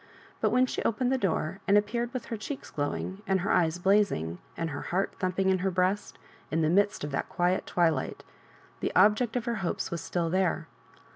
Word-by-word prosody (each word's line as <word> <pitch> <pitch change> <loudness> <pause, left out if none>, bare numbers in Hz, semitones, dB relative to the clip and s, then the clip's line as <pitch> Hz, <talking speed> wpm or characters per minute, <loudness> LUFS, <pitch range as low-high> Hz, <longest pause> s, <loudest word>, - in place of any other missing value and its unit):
But - - +2
when 255 +1 +4
she - - -3
opened 245 +3 +1
the 265 - +3
door, 190 -2 -1
and 200 - +6
appeared 235 +3 0
with 255 -3 -4
her 230 - -4
cheeks 245 +6 -6
glowing, 170 +6 -3
and 190 -1 +2
her 200 - 0
eyes 165 -1 +3
blazing, 180 - +2 0.2
and 165 -1 -2
her 145 - -4
heart 190 +3 0
thumping 190 0 +1
in 190 -1 +3
her 190 +1 +1
breast, 185 +3 0 0.3
in 160 +2 +1
the 155 - +3
midst 200 0 +2
of 145 - -3
that 135 - -2
quiet 180 +1 0
twilight, 170 -2 0 0.6
the - - -1
object 215 +3 +4
of 245 -2 -1
her 235 -2 -1
hopes 175 - -2
was 170 -2 -3
still 165 +1 -1
there. 185 -1 +1
190 Hz, 205 wpm, -29 LUFS, 170-210 Hz, 0.6 s, and